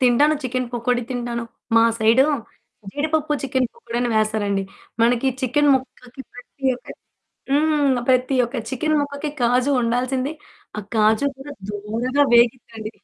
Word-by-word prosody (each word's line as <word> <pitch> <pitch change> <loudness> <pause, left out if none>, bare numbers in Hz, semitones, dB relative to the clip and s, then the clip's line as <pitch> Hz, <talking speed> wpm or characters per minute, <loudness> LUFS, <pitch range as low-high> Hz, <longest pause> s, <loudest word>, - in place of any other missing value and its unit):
తింటాను 260 +5 +4
చికెన్ 255 -1 -2
పకోడీ 245 +1 0
తింటాను. 240 -1 -3 0.3
మా 230 - +6
సైడు 225 +5 +5 0.7
జీడిపప్పు 305 +1 -1
చికెన్ 260 -1 0
పకోడి 240 - -7
అని 245 - 0
వేస్తారండి, 210 -2 0 0.4
మనకి 240 +3 +3
చికెన్ 290 +3 +2
ముక్కకి 260 0 -6
ప్రతి 245 +2 -13
ఒక్క - - -20 0.6
హ్మ్. 290 -2 +2
ప్రతి 255 +1 +2
ఒక్క 240 +3 -6
చికెన్ 305 +4 0
ముక్కకి 285 +1 -3
కాజు 250 +3 +2
ఉండాల్సిందే 255 +4 -1 0.5
ఆ! - - -1
కాజు 220 +5 +3
కూడా 275 +2 -9 0.2
దోరగా 225 +7 -1
వేగిద్దండి. 235 -2 +2
255 Hz, 130 wpm, -21 LUFS, 235-280 Hz, 0.7 s, మా